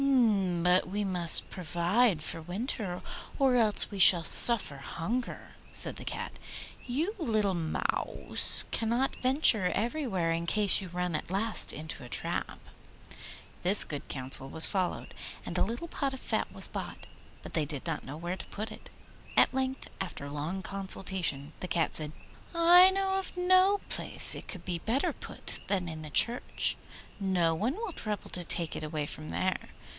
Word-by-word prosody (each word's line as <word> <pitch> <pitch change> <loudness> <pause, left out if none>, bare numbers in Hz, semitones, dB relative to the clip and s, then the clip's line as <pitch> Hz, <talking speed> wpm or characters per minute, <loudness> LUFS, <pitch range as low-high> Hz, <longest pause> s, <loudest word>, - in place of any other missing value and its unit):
'But 180 +1 +2
we 205 +2 -3
must 180 -4 +3
provide 175 +2 -1
for - - -6
the 165 - -10
winter 190 - -5 0.4
or 270 -3 +2
else 220 -3 +2
we 200 - -7
shall 175 -2 +8
suffer 205 - +4
hunger,' 205 - -6 0.2
said - - +7
the - - -10
Cat. - - -6 0.5
'You, 305 - -3
little 215 - -1
Mouse, 165 -3 +2
cannot 235 +4 -1
venture 255 -7 +2
everywhere 225 - -2
in 165 +1 -3
case 205 0 +2
you 190 - -8
run 180 -1 -4
at - - -5
last 210 +4 +2
into 155 -2 -8
a 120 - -12
trap.' - - -5 1.0
This 190 +4 +5
good 145 -2 -8
counsel 130 0 +1
was 160 - +10
followed, 185 -3 -1 0.3
and - - -7
a - - +1
little 240 +9 -5
pot 275 -4 -4
of - - -11
fat - - -3
was - - -1
bought. - - -8 0.4
But - - -11
they 155 -3 -1
did 145 -2 -7
not 165 -3 -5
know 145 +3 -9
where 175 +3 -6
to - - -7
put 215 +2 -7
it. - - -13 0.5
At - - +4
length, 265 0 -4
after 140 - -7
long 155 +6 -6
consultation, 185 -7 -4
the 185 - -6
Cat 170 -2 -1
said, 150 -1 -1 0.4
'I 350 +2 +6
know 385 0 -1
of 380 - -9
no 370 +2 +2
place - - +6
where - - -3
it - - -14
could 180 -4 -4
be 175 -2 -4
better 235 +10 -2
put - - -7
than 185 -3 -2
in 160 -1 -8
the 155 - -8
church. 235 +11 +3 0.4
No 180 -4 0
one 220 - -3
will 440 -4 -6
trouble 210 -7 -7
to 180 - -2
take 170 -1 -1
it - - -7
away 155 -1 -4
from 155 +1 -10
there. 185 0 -3
190 Hz, 170 wpm, -28 LUFS, 165-240 Hz, 1.0 s, was